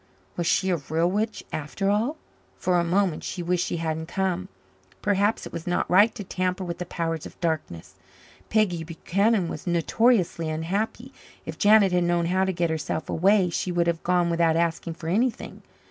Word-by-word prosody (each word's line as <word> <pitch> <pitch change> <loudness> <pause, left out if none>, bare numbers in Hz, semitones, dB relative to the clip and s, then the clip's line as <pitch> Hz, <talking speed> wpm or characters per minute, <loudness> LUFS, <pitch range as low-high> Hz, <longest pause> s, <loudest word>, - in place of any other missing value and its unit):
Was 170 -1 -2
she 190 -1 +2
a 175 - +2
real 160 +4 0
witch 215 +2 -2
after 175 +7 -1
all? 230 +10 0 0.4
For 180 -1 +1
a - - +2
moment 180 -1 +1
she 175 - -4
wished 180 +1 0
she - - -2
hadn't 160 -1 -3
come. 185 0 -1 0.6
Perhaps 205 +1 +1
it - - -9
was 165 0 -6
not 175 - 0
right 205 +5 +5
to 205 - -6
tamper 185 0 -2
with 170 -1 -5
the 180 - -4
powers 165 -3 -3
of - - -16
darkness. 155 - -3 0.6
Peggy 195 -7 +1
Buchanan 190 +5 0
was 165 - -7
notoriously 175 -1 +2
unhappy. 200 +11 -3 0.3
If - - -7
Janet 205 -2 +6
had 180 -1 +2
known 175 -1 +1
how 185 +2 +1
to 190 - 0
get 170 -2 -1
herself 160 0 -3
away, 190 +1 +3
she 180 - -2
would 175 -1 +1
have 170 -1 0
gone 175 -1 +1
without 165 -1 +2
asking 165 0 -1
for 160 - -8
anything. 225 +8 -1
175 Hz, 185 wpm, -25 LUFS, 165-195 Hz, 0.6 s, Janet